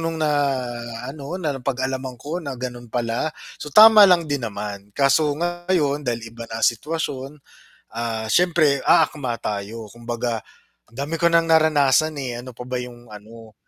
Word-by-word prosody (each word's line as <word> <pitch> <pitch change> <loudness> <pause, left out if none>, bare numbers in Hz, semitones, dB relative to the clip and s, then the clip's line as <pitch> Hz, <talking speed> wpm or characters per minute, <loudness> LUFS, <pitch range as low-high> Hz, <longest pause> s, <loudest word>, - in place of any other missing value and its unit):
no'ng 165 0 -2
na 155 -1 +1 0.7
ano, 140 +5 -6
na 160 -6 -2
napag-alaman 130 0 -3
ko 160 +9 -5
na 140 -5 -6
gano'n 120 -1 -7
pala, 120 +5 -1 0.3
so 150 - -6
tama 215 +4 +9
lang 175 -2 +4
din 145 -3 -2
naman. 100 -1 -7
Kaso 145 +1 +3
ngayon 175 -3 0
dahil 115 -3 -4
iba 115 0 -9
na 115 0 -2
sitwasyon, 145 +2 -2 0.6
ah, 115 -1 -3
siyempre 160 -6 +3
aakma 130 -6 +2
tayo. 105 +2 -5
Kumbaga, 120 -1 -3 0.5
ang 115 - -19
dami 145 +4 -3
ko 170 - +5
nang 165 0 +3
naranasan, 155 -1 +3
eh, 125 -3 -4
ano 125 -1 -11
pa 125 - -7
ba 125 0 -3
'yong 120 -2 -11
ano? 110 +1 -13
130 Hz, 160 wpm, -22 LUFS, 115-155 Hz, 0.7 s, tama